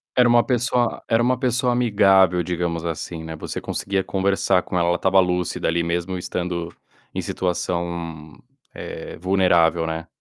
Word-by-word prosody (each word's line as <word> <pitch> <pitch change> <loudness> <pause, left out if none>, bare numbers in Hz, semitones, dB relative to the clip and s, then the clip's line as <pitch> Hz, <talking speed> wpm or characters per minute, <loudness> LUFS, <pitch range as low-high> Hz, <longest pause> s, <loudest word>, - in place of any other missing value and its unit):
Era 125 -1 +5
uma 120 0 +5
pessoa 120 -1 0
era 115 +1 +2
uma 125 +1 +2
pessoa 125 0 +1
amigável, 95 -6 +4
digamos 85 -1 -2
assim, 80 0 -5
né, 80 0 -6
você 75 - -6
conseguia 100 -1 -2
conversar 95 -1 +1
com - - -6
ela, 85 0 +2
ela 85 - +2
estava 95 +1 +3
lúcida 90 -2 0
ali 85 +1 +1
mesmo 85 +2 -2
estando 85 -1 -4 0.4
em - - -2
situação, 85 -3 -3 0.4
eh, - - -8
vulnerável, 85 -3 +3
né. 80 +1 -4
90 Hz, 155 wpm, -22 LUFS, 85-100 Hz, 0.4 s, Era